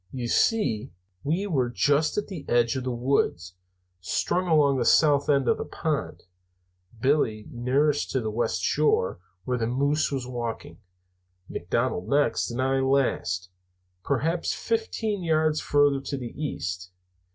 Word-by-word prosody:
"You 125 -2 -4
see, 115 - +1 0.3
we 170 +7 0
were 135 -11 0
just 145 - +1
in 210 - 0
the 180 -8 -7
edge 120 +1 +2
of 130 -1 -3
the 130 - -1
woods, 120 -8 0 0.5
strung 180 - -1
along 145 -5 +3
the - - +1
south 145 +2 +4
end 140 -3 +3
of - - +2
the - - -2
pond, - - -3 0.8
Billy 110 -5 +1
nearest 140 +5 +1
the 115 -5 -1
west 105 -5 -1
shore, 150 - +1 0.2
where 125 +3 -1
the 115 - 0
moose 140 +5 +1
was 135 -3 -2
walking, 120 -2 -5 0.7
McDonald 95 +1 -2
next, 145 +1 +2
and 120 +1 -5
I 135 0 +1
last, 130 -9 0 0.5
perhaps 160 +6 0
fifteen 220 -2 -2
yards 155 -2 +1
farther 145 -1 +3
to 140 +1 -4
the 125 -3 -7
east. 90 - -4
135 Hz, 140 wpm, -26 LUFS, 120-150 Hz, 0.8 s, south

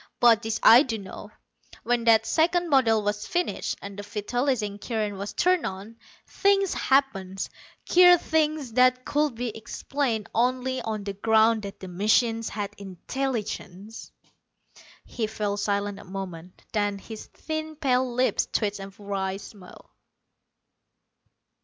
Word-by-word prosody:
But 230 -2 +5
this 225 0 -2
I 235 +3 +9
do 240 -6 -2
know: 195 -3 -10 0.5
when 240 0 0
that 225 -1 +5
second 340 +7 +1
model 230 -7 +3
was 205 0 -2
finished, 350 0 -2
and 200 0 -8
the - - -3
vitalizing 210 +1 -2
current 215 -2 -3
was 200 +1 -5
turned 365 -2 +2
on, 200 +4 -6 0.3
things 395 -2 +2
happened 195 -9 0 0.4
queer 355 0 +7
things 310 -6 -1
that 255 +1 +3
could 295 -3 0
be 235 -1 -4
explained 235 0 -3
only 255 +2 0
on 215 -2 -4
the 200 0 -4
ground 220 +2 +3
that 200 0 -8
the 190 - -8
machine 215 +5 +2
had 210 -2 -4
intelligence." 210 0 -5 0.9
He 225 -3 -3
fell 210 -1 -2
silent 205 0 -2
a - - -11
moment, 185 -2 -8
then 205 -2 0
his 215 +2 -10
thin 315 0 -5
pale 260 -4 +1
lips 250 +2 +1
twisted 205 -2 -1
in 195 - -12
a - - -13
wry 195 -1 -2
smile. 195 -2 -14
225 Hz, 140 wpm, -26 LUFS, 200-260 Hz, 0.9 s, I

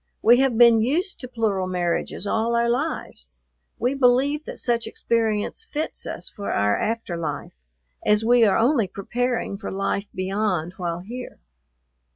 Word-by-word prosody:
We 240 +3 +6
have 265 -4 +2
been 235 -2 +7
used 335 - 0
to 255 - -6
plural 215 -6 -1
marriages 180 +1 -1
all 225 +3 0
our 235 0 +2
lives. 260 +7 -3 0.5
We 250 +2 0
believe 275 +3 +2
that - - -7
such 235 -2 0
experience 225 - -1
fits 310 -8 -5
us - - -5
for 200 - -5
our 105 0 +2
after 225 -5 -2
life, 160 -4 -4 0.5
as 210 +1 +3
we 240 0 +5
are 205 -3 +4
only 235 -2 +3
preparing 240 +1 -2
for - - -5
life 195 +1 -2
beyond 185 -3 -1
while 175 -1 -3
here." 245 +6 -8
225 Hz, 155 wpm, -23 LUFS, 195-245 Hz, 0.5 s, been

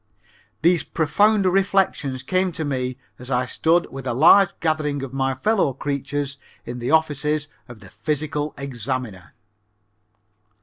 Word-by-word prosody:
These 170 0 +4
profound 205 +6 +2
reflections 185 -8 +1
came 185 0 +1
to 160 - -3
me 130 -2 -2 0.2
as 125 +1 -9
I 125 -1 +1
stood 165 +6 +1
with 135 -1 -7
a 120 - -1
large 180 +8 +7
gathering 150 -3 -1
of 135 -1 -7
my 135 -1 0
fellow 195 -2 +1
creatures 140 +1 -3 0.3
in 120 +1 -6
the 120 - -3
offices 150 -1 +1 0.2
of 120 -3 -12
the 95 - -12
physical 150 0 -3
examiner. 125 -6 -5
145 Hz, 135 wpm, -22 LUFS, 130-160 Hz, 0.3 s, large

